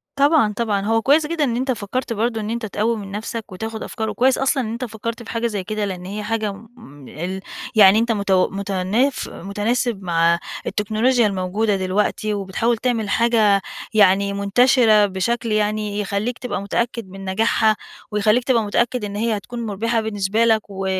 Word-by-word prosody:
طبعًا، 280 -6 +3
طبعًا، 205 -4 0
هو 225 +1 +2
كويّس 300 +4 +4
جدًا 325 -2 -1
إن 240 -4 0
أنت 260 +2 0
فكرت 230 +2 -3
برضو 225 +1 -1
إن 210 0 -4
أنت 235 -1 -3
تقوي 220 +3 -1
من 195 -2 -8
نفْسَك 215 0 -5
وتاخد 220 +4 -5
أفكار، 220 -2 -4
وكويّس 260 +1 +2
أصلًا 270 -1 +1
إن 220 - -4
أنت 245 +2 -4
فكرت 230 +1 -6
في - - -12
حاجة 230 0 0
زي 205 -4 -3
كده، 215 +1 -2
لأن 180 -2 -5
هي 210 +2 -5
حاجة 215 -1 -1
م 200 - -14
ال 185 +5 -5 0.3
يعني 205 0 +7
أنت 230 0 +1
متو 200 -3 +2
متناف 200 +7 -1
متناسب 210 +3 -2
مع 170 0 +2 0.3
التكنولوجيا 220 +3 +2
الموجودة 200 +2 0
دلوقتي 205 +3 -1
وبتحاول 205 +4 -1
تعمل 225 -4 -1
حاجة 220 -4 +3 0.3
يعني 200 -1 +4
منتشرة 215 +1 +4
بشكل 225 +4 -2
يعني 210 -1 0
يخليك 210 +4 -2
تبقى 245 -6 -3
متأكّد 230 +1 -2
من 195 +1 -9
نجاحها، 220 +2 +2 0.4
ويخليك 215 +4 +2
تبقى 240 -4 +2
متأكّد 235 +2 0
إن 200 0 -6
هي 220 0 0
هتكون 235 +3 -6
مُربحة 225 +3 -1
بالنسبة 215 +1 0
لك، 220 -1 +3
و 195 -1 -5
215 Hz, 175 wpm, -21 LUFS, 200-235 Hz, 0.4 s, يعني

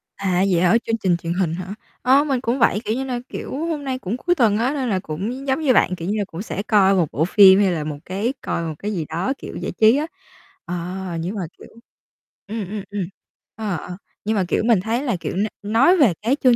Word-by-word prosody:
À, 190 -2 +1
vậy 170 -1 +3
hả, 185 +6 +5
chương 225 0 0
trình 185 -5 +1
truyền 170 0 -3
hình 175 -3 0
hả? 185 +2 -6 0.3
Ơ, 270 +3 +5
mình 270 -4 -1
cũng 250 +1 -1
vậy, 235 - +3
kiểu 220 - 0
như 265 - -2
nà, 250 -2 -2
kiểu, - - -6 0.2
hôm 310 -4 -3
nay 260 -1 -3
cũng 215 +4 -3
cuối 355 +6 +1
tuần 225 -7 +3
á, 245 +5 +1
nên 265 -5 -2
là 190 -2 +1
cũng 185 +4 -4
nh 270 +3 -6
giống 265 +3 +1
như 275 -5 +3
bạn, 180 -6 +3
kiểu 170 +1 -5
như 215 - 0
là, 205 - 0
cũng 175 -1 -7
sẽ 200 -2 -4
coi 200 -3 +4
một 175 -4 +2
bộ 155 - +1
phim 190 0 +7
hay 195 -3 +3
là 160 -3 -2
một 150 -1 -4
cái 205 +8 -2
coi 170 - -2
một 160 -1 -3
cái 210 - -3
gì 165 -5 -2
đó, 190 +11 -1
kiểu, - - -9
giải - - -4
trí 220 +5 +4
á. 305 - -1 0.6
Ờ, 175 - -4 0.4
nhưng 180 +6 -3
mà, 200 - -3 0.2
kiểu - - -13 0.8
ừm, 215 -3 -4
ừm, 205 -2 -4
ừm, 205 -1 -3 0.5
ờ, 215 -4 -2
ờ. 180 +3 -8 0.3
Nhưng 220 +1 +1
mà, 195 - +2
kiểu, - - 0
mình 230 -5 +4
thấy 230 +6 -1
là, 245 -8 0
kiểu, - - -4
n 205 +3 +1
nói 235 - +4
về 255 - +5
cái 235 +6 +2
chương 250 -2 +6
210 Hz, 260 wpm, -21 LUFS, 185-250 Hz, 0.8 s, phim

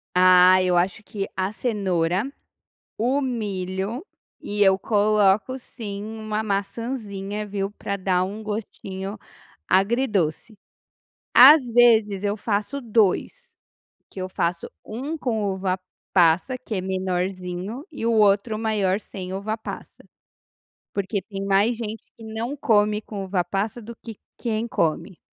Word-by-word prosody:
Ah, 185 0 +7
eu 180 -1 +2
acho 185 +5 0
que 200 -2 -4
a 190 +1 -1
cenoura, 195 -1 -1 0.7
o 255 +6 +1
milho 210 - -3 0.4
e 205 0 -4
eu 190 -1 +6
coloco 210 +3 +2
sim 210 -6 -7
uma 215 0 -4
maçãzinha, 205 0 -3
viu, 195 -1 -3
pra 200 -1 -4
dar 185 -1 +1
um 205 +3 -6
gostinho 205 -2 -5 0.5
agridoce. 205 - +1 0.8
Às 265 +2 +9
vezes 220 -4 +4
eu 205 +1 0
faço 210 +5 -2
2, 235 - 0 0.5
que - - -12
eu 185 - -5
faço 170 -1 -1 0.2
1 275 +9 -5
com 220 -7 -1
uva-passa, 185 +2 +1
que 245 -3 -7
é 185 - 0
menorzinho, 185 - -3
e 255 -6 -4
o 230 - +3
outro 210 +1 +3
maior 210 -4 +1
sem 190 -3 -7
uva-passa. 215 +3 -6 0.9
Porque 200 +1 -1
tem 195 +1 -6
mais 200 +4 +3
gente 220 -1 -5
que 225 - -12
não 225 +5 -4
come 210 -4 +2
com 200 -2 -6
uva-passa, 195 +5 -1
do 235 +2 -9
que 225 -3 -10 0.2
quem 225 -1 -2
come. 170 -1 -1
205 Hz, 125 wpm, -24 LUFS, 190-225 Hz, 0.9 s, Às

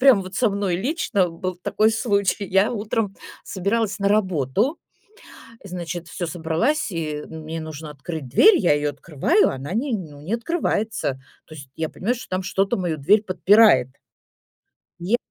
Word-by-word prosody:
прям 255 -7 +6
вот 185 +1 -9
со 240 -2 +2
мной 195 -3 -1
лично 205 - 0
был 180 +2 -4
такой 215 +4 +1
случай. 205 -3 0
Я 195 +5 +2
утром 210 -2 -2 0.3
собиралась 200 +1 -1
на 200 0 +1
работу, 195 - +1 0.9
значит, 175 -2 -6
всё 175 +2 -4
собралась, 180 - 0
и 155 -3 -3
мне 160 0 -6
нужно 155 -1 -7
открыть 150 -1 -7
дверь, 385 - +6
я 175 -7 +3
её 145 0 0
открываю, 160 - +1
она 135 +6 -6
не 255 +3 -1
ну, 150 -8 -6
не 185 +10 -3
открывается. 220 - -1 0.3
То 155 - -12
есть 140 -3 -11
я 160 -1 -2
понимаю, 230 +7 -1
что 250 - -10
там 185 0 -2
что-то 195 +4 0
мою 170 -4 -2
дверь 205 +10 +4
подпирает. 190 - +5 1.1
Не 195 +8 +1
185 Hz, 155 wpm, -23 LUFS, 160-215 Hz, 1.1 s, прям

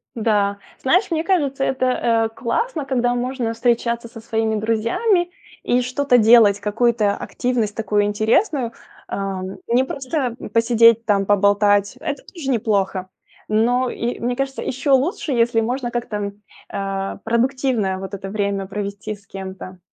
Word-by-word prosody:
Да, 205 -3 +1 0.2
знаешь, 365 +8 +2
мне 320 0 0
кажется, 285 -8 0
это, 260 -1 0
э, 230 -3 +1
классно, 310 - -2
когда 245 -2 +1
можно 245 -1 -2
встречаться 235 0 0
со 225 0 -11
своими 220 -1 -1
друзьями 235 - +1 0.3
и 245 +1 +2
что-то 250 +1 +2
делать, 220 -3 +6
какую-то 210 -1 +1
активность 235 -4 -2
такую 210 -2 +1
интересную. 230 - +1 0.4
Эм, 190 -1 -4
не 245 +3 +3
просто 265 -2 -3 0.2
посидеть 230 0 +5
там, 200 -2 +2
поболтать- 205 +2 +3
это 290 -2 -4
тоже 305 -7 -5
неплохо. 195 -5 0 0.4
Но 245 +4 +2
и, 240 +1 -3
мне 245 +1 -1
кажется, 270 0 -3
еще 265 +3 -2
лучше, 290 - +1
если 230 -2 +2
можно 245 +1 -2
как-то, 210 -4 -3 0.4
э, 195 0 -3
продуктивное 235 -4 0
вот 190 +1 -7
это 195 0 -6
время 200 -1 -1
провести 200 +2 -5
с 200 0 -23
кем-то. 190 -1 -8
230 Hz, 140 wpm, -21 LUFS, 205-255 Hz, 0.4 s, делать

